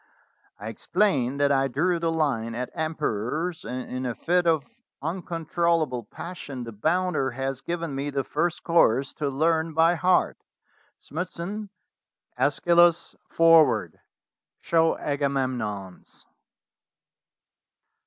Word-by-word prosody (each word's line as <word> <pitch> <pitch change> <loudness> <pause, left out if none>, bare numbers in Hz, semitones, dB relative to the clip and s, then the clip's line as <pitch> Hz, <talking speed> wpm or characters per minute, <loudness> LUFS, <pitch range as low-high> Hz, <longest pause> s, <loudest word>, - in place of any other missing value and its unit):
I 105 +2 -6
explained 140 - 0
that 140 0 +3
I 135 -1 +3
drew 170 +7 0
the 165 0 0
line 125 -8 -1
at 125 +1 -4
emperors, 155 - -2
and 125 +3 -5
in 130 0 -4
a 120 - -3
fit 175 +1 +1
of 160 -4 +2 0.3
uncontrollable 165 - -1
passion 145 -2 -7
the 115 - -7
bounder 160 - 0
has 135 +1 -4
given 170 -2 -4
me 140 +2 -3
the 140 -1 -1
first 170 +5 -1
chorus 135 -6 +3
to 145 -2 0
learn 160 +3 0
by 165 +1 +5
heart. 180 +2 +2 0.6
Smithson, 180 +5 -5 0.7
^Eschylus 175 -1 +3 0.2
forward. 155 - +4 0.6
Show 165 -1 +2
Aga 145 -1 -1
memnons." 110 -9 -4
155 Hz, 115 wpm, -25 LUFS, 130-170 Hz, 0.7 s, by